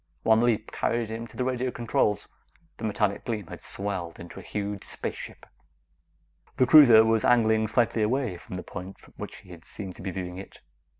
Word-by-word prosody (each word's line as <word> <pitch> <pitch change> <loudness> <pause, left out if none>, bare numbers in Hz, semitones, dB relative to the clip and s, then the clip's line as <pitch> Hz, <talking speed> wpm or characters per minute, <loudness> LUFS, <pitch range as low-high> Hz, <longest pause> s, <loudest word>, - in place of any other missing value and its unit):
One 110 0 +5
leap 115 -2 +1
carried 115 -2 -1
him 115 +1 -5
to - - -15
the 125 - 0
radio 130 0 -1
controls. 110 -4 0 0.5
The - - -10
metallic 105 -2 0
gleam 110 -4 -3
had - - -10
swelled 95 -4 -5
into 85 +2 -9
a - - -8
huge 100 +2 -4
spaceship. - - -7 1.1
The 130 - +5
cruiser 120 -6 +8
was 110 -1 +2
angling 110 -2 +4
slightly 115 -1 +1
away 120 -2 0
from 90 - -9
the 90 - -5
point 95 +1 -8
from - - -20
which - - -7
he 90 -1 -12
seemed 95 +1 -8
to - - -10
be 95 - -4
viewing 90 0 -5
it. 95 - -12
110 Hz, 185 wpm, -27 LUFS, 95-115 Hz, 1.1 s, cruiser